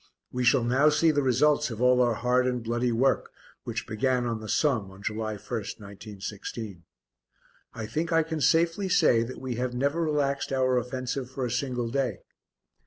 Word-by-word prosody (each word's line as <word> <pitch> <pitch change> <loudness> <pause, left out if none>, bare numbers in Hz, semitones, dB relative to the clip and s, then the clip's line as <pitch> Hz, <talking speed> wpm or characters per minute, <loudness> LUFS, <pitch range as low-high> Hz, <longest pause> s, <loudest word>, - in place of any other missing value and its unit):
We 125 0 -2
shall 125 0 +4
now 130 +6 +4
see 155 +2 +3
the 145 -1 +1
results 145 +3 +3
of 115 -2 -6
all 125 0 +4
our 120 -2 +2
hard 125 +2 +2
and 125 -2 -1
bloody 120 +1 0
work, 130 +3 +1 0.3
which - - -4
began 125 +3 0
on 115 -2 -2
the 110 -1 -8
Somme 120 -10 +1
on 95 +1 -14
July 110 0 -2
1st, 110 +1 -5
1916. 100 -1 -7 0.9
I 115 -1 -4
think 160 +10 -2
I 165 0 +4
can 160 -1 -4
safely 165 +7 +2
say 165 -11 +4
that 115 +3 -5
we 130 -3 -4
have 125 0 -2
never 140 +6 0
relaxed 145 -4 0
our 130 -1 +2
offensive 125 +1 -4
for 130 0 -3
a 120 - -3
single 125 -2 -2
day. 135 -1 -1
125 Hz, 180 wpm, -27 LUFS, 115-140 Hz, 0.9 s, shall